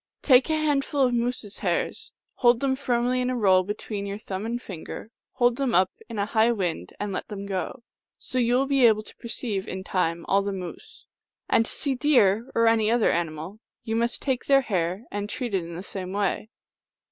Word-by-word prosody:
Take 255 Hz, -1 st, +5 dB
a 315 Hz, -, +2 dB
hand 295 Hz, -3 st, +2 dB
ful 285 Hz, 0 st, -1 dB
of 250 Hz, -2 st, +3 dB
moose 240 Hz, 0 st, 0 dB
s 205 Hz, -, -7 dB
hairs; 455 Hz, -2 st, -1 dB, 0.2 s
hold 240 Hz, -2 st, +4 dB
them 270 Hz, 0 st, +1 dB
firmly 250 Hz, -1 st, 0 dB
in 250 Hz, -, 0 dB
a 255 Hz, -, -1 dB
roll 190 Hz, -4 st, +5 dB
be 205 Hz, +3 st, -3 dB
tween 205 Hz, -2 st, -5 dB
your 200 Hz, 0 st, -4 dB
thumb 200 Hz, 0 st, -5 dB
and 240 Hz, +1 st, -2 dB
finger; 200 Hz, +1 st, -8 dB, 0.2 s
hold 240 Hz, -1 st, +2 dB
them 270 Hz, -4 st, 0 dB
up 185 Hz, +1 st, +4 dB, 0.2 s
in 230 Hz, -, -6 dB
a 200 Hz, -, +1 dB
high 220 Hz, +2 st, +3 dB
wind 175 Hz, -, -2 dB
and 205 Hz, -1 st, -3 dB
let 185 Hz, -, -4 dB
them 200 Hz, -2 st, -6 dB
go. 200 Hz, +5 st, -4 dB, 0.3 s
So 255 Hz, -, -3 dB
you 240 Hz, 0 st, +3 dB
will 265 Hz, +2 st, +3 dB
be 270 Hz, -3 st, +5 dB
able 215 Hz, -1 st, +3 dB
to -, -, -10 dB
perceive, 230 Hz, -4 st, -2 dB
in 190 Hz, 0 st, -5 dB
time, 170 Hz, -3 st, -1 dB
all 195 Hz, +1 st, +3 dB
the 200 Hz, 0 st, -3 dB
moose. 190 Hz, -, -8 dB, 0.4 s
And 225 Hz, -, +3 dB
to -, -, -5 dB
see 280 Hz, -3 st, -1 dB
deer, 245 Hz, -5 st, +3 dB
or 230 Hz, -, +4 dB
any 225 Hz, -1 st, +3 dB
other 235 Hz, -1 st, +3 dB
animal, 165 Hz, +4 st, -3 dB, 0.2 s
you 225 Hz, -1 st, -2 dB
must 235 Hz, +1 st, -1 dB
take 260 Hz, -3 st, -1 dB
their 275 Hz, -1 st, +6 dB
hair 185 Hz, -3 st, -1 dB
and 205 Hz, 0 st, -3 dB
treat 245 Hz, -3 st, -3 dB
it 190 Hz, -3 st, +1 dB
in 165 Hz, 0 st, -8 dB
the 180 Hz, -, -6 dB
same 185 Hz, -2 st, -6 dB
way." 205 Hz, +1 st, -1 dB
225 Hz, 220 wpm, -25 LUFS, 195-250 Hz, 0.4 s, their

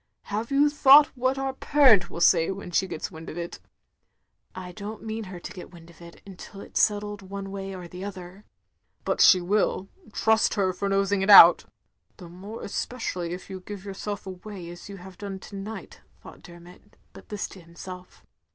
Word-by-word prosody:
"Have 215 Hz, +3 st, -4 dB
you 280 Hz, +1 st, +4 dB
thought 290 Hz, 0 st, +6 dB
what 260 Hz, +1 st, 0 dB
our 270 Hz, 0 st, -2 dB
parent 260 Hz, -10 st, +4 dB
will 170 Hz, -, -7 dB
say 165 Hz, -1 st, +4 dB
when 195 Hz, -2 st, -6 dB
she 190 Hz, +3 st, +1 dB
gets 155 Hz, -, -6 dB
wind 160 Hz, -1 st, -10 dB
of 160 Hz, -, -8 dB
it?" 170 Hz, 0 st, -6 dB, 0.5 s
" -, -, -46 dB
I 180 Hz, -1 st, -7 dB
don't 210 Hz, +3 st, -8 dB
mean 220 Hz, 0 st, -5 dB
her 185 Hz, -2 st, -9 dB
to -, -, -9 dB
get 180 Hz, -, -10 dB
wind 170 Hz, -1 st, -15 dB
of 170 Hz, -, -20 dB
it, 170 Hz, 0 st, -14 dB
until 195 Hz, +1 st, -11 dB
it -, -, -13 dB
's -, -, +2 dB
settled 205 Hz, -1 st, 0 dB
one 195 Hz, 0 st, -7 dB
way 195 Hz, -1 st, -6 dB
or 180 Hz, -1 st, -9 dB
the 180 Hz, +2 st, -9 dB
other. 190 Hz, 0 st, -9 dB, 0.3 s
" -, -, -46 dB
"But -, -, 0 dB
she 185 Hz, -, +7 dB
will 195 Hz, +1 st, 0 dB
— -, -, -30 dB
^trust 220 Hz, +1 st, +2 dB
her 190 Hz, -3 st, +1 dB
for 200 Hz, +2 st, -3 dB
nosing 195 Hz, 0 st, +1 dB
it 195 Hz, -, -1 dB
out." 175 Hz, -4 st, +9 dB, 0.5 s
(The 180 Hz, -, -11 dB
more 195 Hz, +6 st, -9 dB
especially 190 Hz, -6 st, -4 dB
if 180 Hz, -, -8 dB
you 190 Hz, -1 st, -7 dB
give 200 Hz, +1 st, -9 dB
yourself 205 Hz, +1 st, -6 dB
away 185 Hz, -1 st, -9 dB
as 175 Hz, +3 st, -12 dB
you 200 Hz, -, -8 dB
have 185 Hz, 0 st, -13 dB
done 200 Hz, -2 st, -6 dB
to 200 Hz, -, -12 dB
night, 205 Hz, +3 st, -8 dB, 0.2 s
thought -, -, -13 dB
Dermot, 175 Hz, +3 st, -16 dB, 0.2 s
but -, -, -15 dB
this 210 Hz, -1 st, -4 dB
to 190 Hz, -, -13 dB
himself.) 180 Hz, +2 st, -12 dB
195 Hz, 205 wpm, -25 LUFS, 180-210 Hz, 0.5 s, out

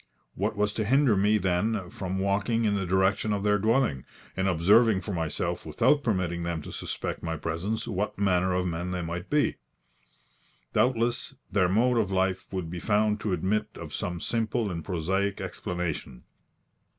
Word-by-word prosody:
What 105 Hz, +3 st, -1 dB
was 105 Hz, 0 st, +1 dB
to 110 Hz, -, -1 dB
hinder 130 Hz, +1 st, +4 dB
me, 105 Hz, +2 st, +3 dB
then, 95 Hz, 0 st, 0 dB
from 95 Hz, 0 st, -4 dB
walking 100 Hz, +4 st, +1 dB
in 105 Hz, -, +2 dB
the 100 Hz, -2 st, -1 dB
direction 95 Hz, +3 st, +2 dB
of 100 Hz, -1 st, -1 dB
their 105 Hz, 0 st, +3 dB
dwelling, 110 Hz, -, +2 dB, 0.3 s
and 95 Hz, +1 st, 0 dB
observing 100 Hz, +4 st, +4 dB
for 100 Hz, +3 st, -5 dB
myself, 80 Hz, -3 st, -2 dB
without 150 Hz, -, +2 dB
permitting 90 Hz, -8 st, -1 dB
them 85 Hz, -2 st, -3 dB
to -, -, -8 dB
suspect -, -, -4 dB
my 80 Hz, -1 st, -3 dB
presence, 85 Hz, +9 st, -3 dB
what 100 Hz, +3 st, -2 dB
manner 95 Hz, -2 st, +2 dB
of 90 Hz, 0 st, 0 dB
men 85 Hz, +1 st, -2 dB
they 90 Hz, -1 st, -2 dB
might 85 Hz, +3 st, -5 dB
be? 150 Hz, 0 st, +2 dB, 1.2 s
Doubtless, 120 Hz, +3 st, +1 dB, 0.2 s
their 95 Hz, -2 st, +3 dB
mode 120 Hz, +5 st, +3 dB
of 100 Hz, -3 st, 0 dB
life 95 Hz, 0 st, 0 dB
would 90 Hz, -4 st, -4 dB
be 90 Hz, -, -4 dB
found 105 Hz, +2 st, +2 dB
to 105 Hz, -, -2 dB
admit 95 Hz, +4 st, 0 dB
of -, -, -8 dB
some 90 Hz, -1 st, -3 dB
simple 115 Hz, +1 st, -1 dB
and 85 Hz, -2 st, -4 dB
prosaic 95 Hz, +3 st, -1 dB
explanation. 85 Hz, -8 st, -4 dB
95 Hz, 170 wpm, -27 LUFS, 90-110 Hz, 1.2 s, hinder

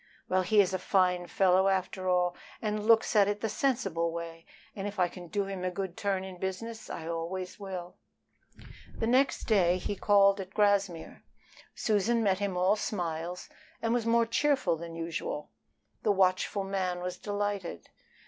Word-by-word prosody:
Well, 185 Hz, 0 st, +2 dB
he 205 Hz, +4 st, +3 dB
is 190 Hz, -1 st, 0 dB
a 185 Hz, -, 0 dB
fine 180 Hz, -1 st, +2 dB
fellow 190 Hz, +1 st, +3 dB
after 185 Hz, -1 st, 0 dB
all, 180 Hz, -1 st, +2 dB, 0.2 s
and 210 Hz, -1 st, -2 dB
looks 225 Hz, 0 st, +4 dB
at 200 Hz, -2 st, +6 dB
it 205 Hz, 0 st, -2 dB
the 225 Hz, -, -1 dB
sensible 195 Hz, -11 st, 0 dB
way, 165 Hz, 0 st, -7 dB, 0.3 s
and 195 Hz, 0 st, -4 dB
if 205 Hz, 0 st, -7 dB
I 180 Hz, -, +4 dB
can 175 Hz, 0 st, -10 dB
do 200 Hz, +3 st, -1 dB
him 195 Hz, -2 st, -5 dB
a 185 Hz, -, 0 dB
good 185 Hz, -1 st, -4 dB
turn 195 Hz, -2 st, -1 dB
in 185 Hz, -2 st, -9 dB
business 220 Hz, +4 st, -5 dB
I 160 Hz, -, -6 dB
always 175 Hz, +3 st, -4 dB
will." 185 Hz, -3 st, -7 dB, 1.0 s
The -, -, -1 dB
next 255 Hz, +4 st, +2 dB
day 185 Hz, -5 st, +3 dB
he 195 Hz, +2 st, -3 dB
called 200 Hz, 0 st, +4 dB
at 190 Hz, 0 st, -7 dB
Grassmere. 200 Hz, -5 st, +1 dB, 0.5 s
Susan 225 Hz, +2 st, +1 dB
met 195 Hz, -2 st, +2 dB
him 200 Hz, -3 st, -2 dB
all 185 Hz, +3 st, +3 dB
smiles 175 Hz, -4 st, -3 dB, 0.3 s
and 230 Hz, 0 st, 0 dB
was 235 Hz, -2 st, 0 dB
more 230 Hz, 0 st, +4 dB
cheerful 260 Hz, -, +2 dB
than 165 Hz, 0 st, -8 dB
usual. 165 Hz, -2 st, -4 dB, 0.5 s
The 210 Hz, -, +2 dB
watchful 190 Hz, +1 st, +2 dB
man 185 Hz, -2 st, -2 dB
was 180 Hz, 0 st, -4 dB
delighted. 205 Hz, -, -3 dB
190 Hz, 170 wpm, -30 LUFS, 180-205 Hz, 1.0 s, at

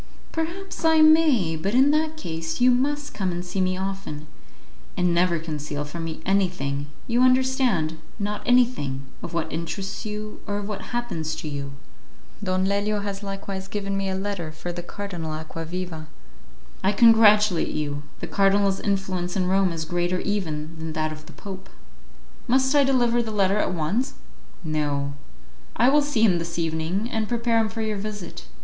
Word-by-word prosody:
"Perhaps 340 Hz, +5 st, -4 dB
I 320 Hz, -1 st, +5 dB
may; 310 Hz, -, +5 dB
but 195 Hz, +8 st, -1 dB
in 270 Hz, +3 st, +6 dB
that 310 Hz, +1 st, +1 dB
case 165 Hz, -, -4 dB
you 250 Hz, +1 st, +6 dB
must 290 Hz, +4 st, 0 dB
come 190 Hz, -3 st, -1 dB
and 175 Hz, +1 st, -4 dB
see 185 Hz, +2 st, -2 dB
me 185 Hz, 0 st, +1 dB
often, 190 Hz, -6 st, -4 dB, 0.7 s
and 180 Hz, -1 st, +2 dB
never 175 Hz, 0 st, +3 dB
conceal 150 Hz, -2 st, -4 dB
from 165 Hz, +3 st, -5 dB
me 160 Hz, -1 st, -6 dB
anything, 175 Hz, -8 st, 0 dB, 0.2 s
you 240 Hz, 0 st, +2 dB
understand, 255 Hz, -, +3 dB, 0.2 s
not 210 Hz, 0 st, -2 dB
anything, 235 Hz, -, +2 dB, 0.2 s
of -, -, -6 dB
what 165 Hz, -1 st, -2 dB
interests 170 Hz, +4 st, -4 dB
you, 215 Hz, 0 st, -6 dB
or 205 Hz, -, -1 dB
of 205 Hz, -1 st, -4 dB
what 210 Hz, -2 st, -5 dB
happens 200 Hz, -11 st, -2 dB
to -, -, -6 dB
you." 140 Hz, -1 st, -4 dB, 0.7 s
"Don 185 Hz, -1 st, +1 dB
Lelio 205 Hz, +1 st, 0 dB
has 200 Hz, -1 st, -4 dB
likewise 195 Hz, -1 st, -5 dB
given 200 Hz, 0 st, -3 dB
me 195 Hz, 0 st, -1 dB
a 190 Hz, -, -1 dB
letter 190 Hz, -4 st, -3 dB
for 160 Hz, +3 st, -6 dB
the 175 Hz, -, -5 dB
Cardinal 175 Hz, -4 st, -5 dB
Acquaviva." 165 Hz, +1 st, -5 dB, 0.8 s
"I 195 Hz, -, +3 dB
congratulate 210 Hz, -4 st, +6 dB
you; 145 Hz, -1 st, -2 dB, 0.2 s
the -, -, -3 dB
cardinal's 195 Hz, 0 st, +3 dB
influence 190 Hz, -3 st, -1 dB
in 185 Hz, -2 st, +1 dB
Rome 190 Hz, 0 st, +3 dB
is 160 Hz, -1 st, -3 dB
greater 175 Hz, +2 st, 0 dB
even 160 Hz, -6 st, -3 dB
than 160 Hz, 0 st, -4 dB
that 155 Hz, 0 st, -1 dB
of 155 Hz, 0 st, -9 dB
the -, -, -11 dB
Pope." 190 Hz, -2 st, -9 dB, 0.8 s
"Must 260 Hz, +2 st, +3 dB
I 290 Hz, -1 st, +6 dB
deliver 240 Hz, -3 st, +3 dB
the 230 Hz, -, -4 dB
letter 200 Hz, -1 st, +2 dB
at -, -, +1 dB
once?" 185 Hz, -, -1 dB, 0.5 s
"No; 145 Hz, -3 st, -1 dB, 0.6 s
I 240 Hz, +3 st, +5 dB
will 295 Hz, +2 st, +5 dB
see 285 Hz, -6 st, +1 dB
him 185 Hz, -6 st, +5 dB
this 170 Hz, 0 st, -4 dB
evening, 165 Hz, +5 st, -1 dB
and 220 Hz, -1 st, -1 dB
prepare 235 Hz, -1 st, +2 dB
him 220 Hz, -1 st, +1 dB
for 225 Hz, 0 st, -3 dB
your 215 Hz, -1 st, -1 dB
visit. 205 Hz, -2 st, -6 dB
195 Hz, 170 wpm, -25 LUFS, 165-225 Hz, 0.8 s, in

